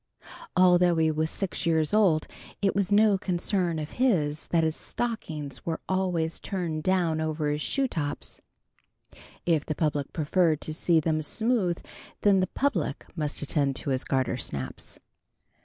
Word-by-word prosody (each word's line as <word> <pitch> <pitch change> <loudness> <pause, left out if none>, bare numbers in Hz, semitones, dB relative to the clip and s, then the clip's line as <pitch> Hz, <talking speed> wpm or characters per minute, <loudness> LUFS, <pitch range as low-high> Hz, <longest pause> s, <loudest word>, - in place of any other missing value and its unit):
Although 180 -1 +5
he 160 -1 +3
was 155 +1 0
six 185 -2 -3
years 160 -1 +2
old 185 -8 +4 0.3
it 195 -1 +1
was 200 0 0
no 205 -1 +5
concern 180 -2 0
of 155 -1 -5
his 155 - +1
that 165 -1 +2
his 160 0 0
stockings 160 - -4
were 165 -1 -2
always 180 -4 0
turning 170 -5 -3
down 170 -3 +1
over 155 -1 -1
his 150 +1 -2
shoe 275 - 0
tops. 145 - -4 1.0
If 160 -4 +2
the 155 - -3
public 150 -3 -1
preferred 160 0 +2
to 155 - -2
see 165 +1 +3
them 155 0 0
smooth 210 +1 0 0.4
then 200 -2 +5
the 185 - +1
public 185 - -1
must 150 -3 -2
attend 140 -2 0
to 140 - -3
his 130 -1 0
gartersnaps. 120 - -2
165 Hz, 150 wpm, -27 LUFS, 155-185 Hz, 1.0 s, Although